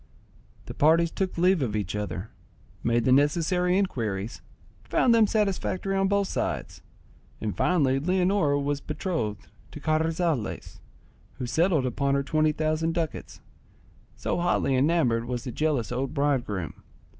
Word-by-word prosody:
The - - -7
parties 165 +2 +3
took 190 -2 -3
leave 180 0 +3
of 110 -5 -1
each 105 -2 -2
other, 105 -1 -4 0.5
made 115 0 +1
the 130 - +3
necessary 170 +6 +3
inquiries, 115 - -2 0.4
found 240 - +3
them 225 -2 +5
satisfactory 195 -2 -1
on 195 0 +2
both 200 0 +1
sides, - - -3 0.6
and 105 -2 -3
finally 140 -7 +2
Leonora 180 -2 +2
was 140 0 -2
betrothed 150 - -3 0.2
to - - -9
Carrizales, 160 -3 -1 0.5
who 130 - -5
settled 160 +3 +2
upon 140 +3 0
her 140 - +1
twenty 155 +2 +2
thousand 155 +1 -1
ducats, 165 -3 -4 0.7
so - - -2
hotly 175 -6 +1
enamoured 130 -5 +2
was 120 -1 -4
the 130 - -5
jealous 145 -5 -1
old 130 +2 -3
bridegroom. 125 - -1
150 Hz, 135 wpm, -26 LUFS, 125-175 Hz, 0.7 s, them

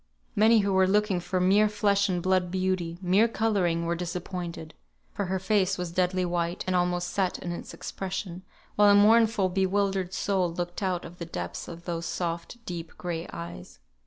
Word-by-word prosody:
Many 220 +1 +5
who 200 -1 0
were 190 0 +4
looking 205 -1 +2
for 175 +1 -2
mere 200 +4 +4
flesh 200 -1 +2
and 175 -2 -1
blood 185 -1 +2
beauty, 185 -2 -1
mere 190 +5 +4
colouring, 195 -7 0
were 170 - 0
disappointed; 175 -1 -5 0.4
for 200 - -2
her 190 +1 -1
face 190 0 +1
was 180 -2 -4
deadly 185 +1 +1
white, 175 0 -1
and 185 - 0
almost 175 0 0
set 190 -2 0
in 175 - -5
its 170 - -6
expression, 190 -2 -5 0.3
while 205 0 +6
a 200 - +7
mournful 220 -1 +5
bewildered 190 0 0
soul 190 -3 0
looked 175 +2 -4
out 185 -3 -1
of 175 +1 -11
the 170 - -4
depths 90 - -5
of 170 0 -9
those 170 -1 -3
soft, 170 +5 -3
deep, 170 -2 -6
gray 170 -2 -4
eyes. 85 +1 -8
185 Hz, 180 wpm, -27 LUFS, 175-195 Hz, 0.4 s, a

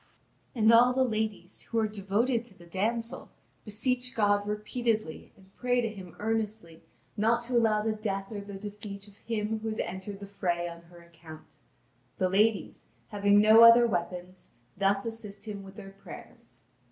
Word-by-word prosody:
And 225 -1 +5
all 245 +2 +6
the 260 +1 +2
ladies, 215 -5 -3
who 230 - -2
are 220 -1 +2
devoted 215 +4 0
to 210 -5 -13
the 175 - -15
damsel, 225 +6 -3 0.3
beseech 250 +4 -1
God 205 -1 +2
repeatedly 215 -3 -2
and 190 0 -22
pray 250 0 +1
to 230 -2 0
Him 190 -5 -10
earnestly 215 -6 -3 0.3
not 230 +3 +2
to 245 +1 -6
allow 220 -3 +3
the 220 - 0
death 200 -2 -4
or 205 -2 -5
the 200 0 -9
defeat 205 0 -8
of 200 -1 -18
him 220 -1 -3
who 220 - -6
has 215 0 -3
entered 190 +2 -6
the 200 - -8
fray 175 -3 -2
on 170 0 -9
her 170 0 -16
account. 165 -2 -14 0.6
The 185 - +1
ladies, 210 +2 +1 0.2
having 205 0 +3
no 215 +2 +7
other 230 +1 +9
weapons, 180 -2 -4 0.3
thus 195 +1 +1
assist 225 -3 -5
him 205 -2 -6
with 195 0 -12
their 195 -2 -10
prayers. 195 0 -13
210 Hz, 170 wpm, -29 LUFS, 195-225 Hz, 0.6 s, other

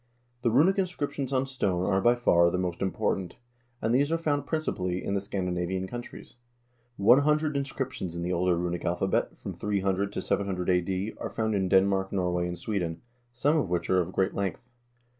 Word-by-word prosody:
The 120 - +2
runic 160 - +4
inscriptions 145 -7 -2
on 130 0 +1
stone 95 -9 -1
are 95 -1 +2
by 120 +3 +5
far 85 -8 +4
the 90 - -1
most 90 -1 -2
important, 95 -1 -1 0.5
and 110 +1 +2
these 140 +4 +3
are 165 - +2
found 145 -4 -1
principally 90 - -2
in 100 - -2
the 100 - 0
Scandinavian 95 -1 -2
countries. 120 +3 -9 0.6
One 115 +7 +6
hundred 150 +1 +2
inscriptions 130 -10 -3
in 85 - -3
the 90 +1 -1
older 90 0 +2
runic 85 0 -2
alphabet, 90 +2 0
from - - -6
300 100 -1 -1
to - - -2
700 95 -2 -1
a.d., 95 +3 0
are - - -4
found 110 -1 -1
in 95 -2 0
Denmark, 95 0 +3
Norway, 90 -2 0
and 90 0 -4
Sweden, 85 -4 -3 0.3
some 140 +6 +1
of 140 - +1
which 90 +1 -1
are 95 0 +4
of 90 +1 -4
great 95 +1 0
length. 100 +5 -4
95 Hz, 185 wpm, -28 LUFS, 90-125 Hz, 0.6 s, One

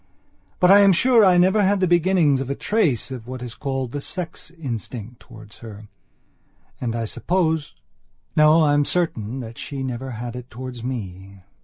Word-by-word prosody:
But 180 +1 +5
I 200 - +8
am 200 -1 +6
sure 240 +4 +4
I 185 -2 +5
never 190 +4 +4
had 200 0 +2
the 185 - +2
beginnings 175 -5 +3
of 135 - -5
a 140 - -1
trace 160 - 0
of 120 -3 -7
what 130 0 -7
is 120 -2 -7
called 135 -3 -4
the 145 - -4
sex 170 -1 -7
instinct 120 - -7
towards 110 -4 -15
her. 105 -2 -11 0.9
And 115 -2 -3
I 115 - -2
supposeno 160 - -1 0.9
I 145 -1 +3
am 145 0 +3
certain 135 -8 -1
that 115 -1 -9
she 135 -2 -5
never 130 0 -5
had 120 0 -6
it 125 0 -9
towards 125 0 -8
me. 95 -6 -7
130 Hz, 175 wpm, -22 LUFS, 115-175 Hz, 0.9 s, I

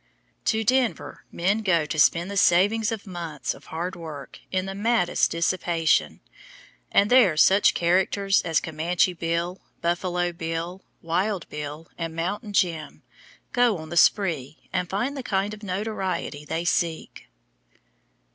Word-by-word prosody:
To 220 0 +1
Denver 255 +1 0
men 195 +6 0
go 170 -7 +2
to 155 +1 -3
spend 170 +5 +3
the - - -5
savings 205 +5 +3
of 220 -3 -5
months 170 -6 -4
of - - -16
hard 175 +4 -4
work 155 -5 -9
in 185 0 0
the 195 - -5
maddest 210 -2 +1
dissipation, 170 -1 +1 0.7
and 205 +3 +3
there 230 -11 +5
such 195 +5 +5
characters 190 +3 +2
as 165 -2 +1
"Comanche 170 +3 0
Bill," 170 +2 -2 0.2
"Buffalo 175 +1 -1
Bill," 165 +2 -4 0.2
"Wild 185 +2 -1
Bill," 150 +2 -6
and 165 -1 -4
"Mountain 205 +6 -3
Jim," 165 -6 -1 0.5
go 245 -5 +3
on 160 -1 -9
the 170 - -5
spree, 165 -7 +2
and 180 -2 -1
find 240 +9 -1
the 270 - -4
kind 200 -3 -1
of 210 - -10
notoriety 190 -6 -3
they 165 +3 -3
seek. 165 - -2
180 Hz, 140 wpm, -25 LUFS, 165-200 Hz, 0.7 s, there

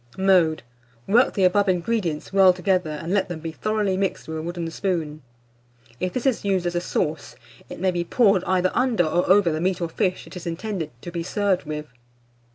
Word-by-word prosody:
Mode. 180 -6 +3 0.4
Work 235 +5 +3
the 195 - +1
above 195 +2 +3
ingredients 180 -3 -1
well 190 -2 +6
together, 180 -2 0
and 160 +4 -4
let 195 -2 +1
them 175 -2 -5
be 165 0 -5
thoroughly 210 +2 -1
mixed 195 0 -2
with 160 - -5
a - - -4
wooden 170 0 -4
spoon. 165 -5 -2 0.8
If 185 -1 -2
this 255 - -3
is 265 -4 +1
used 190 -3 0
as 175 - -1
a 175 - -1
sauce, 160 -3 -3 0.3
it - - -8
may 185 +1 +1
be 175 -1 -1
poured 195 -1 +3
either 185 0 +1
under 245 -6 +2
or 175 +3 0
over 190 -3 +5
the 155 +1 -2
meat 185 +1 0
or 170 -2 -2
fish 185 +1 -1
it - - -12
is 175 -1 -7
intended 170 -1 -4
to 175 - -6
be 170 -1 -3
served 195 +1 0
with. 150 0 -5
180 Hz, 205 wpm, -23 LUFS, 165-195 Hz, 0.8 s, well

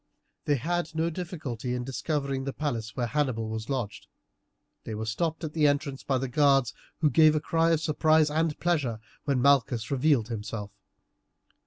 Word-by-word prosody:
They 145 - +3
had 165 +4 -2
no 165 +1 0
difficulty 145 - -4
in 125 - -3
discovering 135 +1 -2
the 135 0 -4
palace 115 -7 -3
where 125 - 0
Hannibal 120 -4 -1
was 110 0 -5
lodged. 125 -7 -3 0.8
They 110 - -5
were 110 +1 -4
stopped 160 +9 -2
at 155 -1 -4
the 155 -2 +3
entrance 140 -1 -1
by 135 - 0
the 135 +1 -2
guards, 135 -3 +3 0.3
who 150 -3 +3
gave 155 +3 +6
a - - +2
cry 165 +2 +1
of 165 -2 +2
surprise 155 -1 +3
and 160 0 0
pleasure 145 -10 0 0.3
when 135 -4 +1
Malchus 125 -4 +3
revealed 135 -4 +2
himself. 105 -2 -5
140 Hz, 170 wpm, -28 LUFS, 120-155 Hz, 0.8 s, gave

